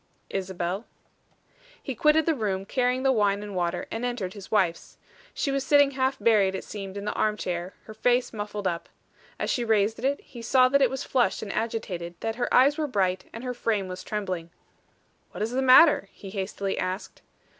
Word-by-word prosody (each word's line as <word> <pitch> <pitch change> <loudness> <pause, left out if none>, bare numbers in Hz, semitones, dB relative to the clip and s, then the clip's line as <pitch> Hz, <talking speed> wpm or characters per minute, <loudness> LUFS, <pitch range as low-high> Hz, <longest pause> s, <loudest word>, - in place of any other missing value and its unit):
"Isabel." 190 +2 -3 1.0
He 270 - -3
quitted 300 +5 +3
the 330 - +3
room, 200 -7 -2
carrying 250 +3 0
the 270 - +4
wine 205 -4 +1
and 205 -2 -7
water, 175 -1 -1
and 225 - -4
entered 240 -7 -3
his 200 -2 -10
wife's. 185 -6 0 0.3
She 280 - -2
was 275 -1 0
sitting 285 -1 +5
half 265 0 0
buried, 200 -4 +3
it - - -4
seemed, 195 -1 -7
in 200 - -5
the 210 - -1
arm 215 -1 0
chair, 180 -1 -4
her 215 - -10
face 245 +3 +1
muffled 210 -1 -5
up. 170 -1 -3 0.5
As - - -1
she 245 - 0
raised 220 0 +1
it, 280 +2 +1
he 240 - -11
saw 255 +2 +4
that 280 +1 +3
it - - +5
was 265 - -4
flushed 255 -2 +1
and 205 - -5
agitated; 185 -7 -3
that 225 0 -3
her 245 - -1
eyes 280 +4 +5
were 305 - 0
bright, 190 -7 0
and 230 - -8
her 250 -1 -3
frame 215 -5 -1
was 185 0 -7
trembling. 185 -5 -4 0.8
"What - - -3
is 220 - -2
the 260 +2 0
matter?" 265 -4 +6
he 195 - -11
hastily 195 0 -3
asked. 185 +2 -4
215 Hz, 200 wpm, -26 LUFS, 195-255 Hz, 1.0 s, matter